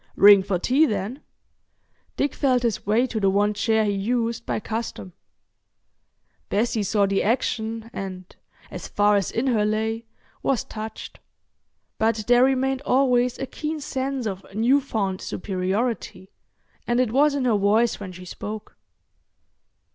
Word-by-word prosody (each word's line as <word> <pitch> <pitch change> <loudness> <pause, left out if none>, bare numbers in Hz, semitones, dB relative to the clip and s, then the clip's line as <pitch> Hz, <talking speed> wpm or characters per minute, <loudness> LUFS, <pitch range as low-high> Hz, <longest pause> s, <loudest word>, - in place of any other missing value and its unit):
"Ring 200 -1 +8
for 190 -1 -1
tea, 270 - +3
then." 210 +5 -3 1.0
Dick 280 -1 0
felt 255 -4 +1
his 225 -4 -1
way 225 +4 +3
to 235 -3 -3
the 195 -2 +3
one 205 +2 +2
chair 220 +1 +1
he 205 - +1
used 230 +3 -1
by - - -1
custom. 220 -4 -5 1.4
Bessie 220 +1 0
saw 200 0 +2
the 195 0 +1
action 225 0 -1
and, 185 -2 -7 0.4
as - - -7
far 205 0 +3
as 200 -2 +1
in 235 - -1
her 230 -5 +2
lay, 220 +2 -1 0.4
was 265 -4 0
touched. 220 0 -8 0.8
But 220 -1 +1
there 245 +1 +5
remained 265 0 +1
always 250 -3 +2
a 270 - -3
keen 310 +3 -4
sense 270 -2 -3
of 195 -3 -4
new 250 +6 +3
found 200 -8 -2
superiority, 190 +1 -3 0.6
and 240 +1 +1
it 250 -4 +1
was 285 +3 +3
in 270 -2 -1
her 235 -3 +3
voice 210 +3 +2
when 195 -3 -7
she 180 0 -11
spoke. 210 +4 -7
220 Hz, 145 wpm, -24 LUFS, 205-250 Hz, 1.4 s, Ring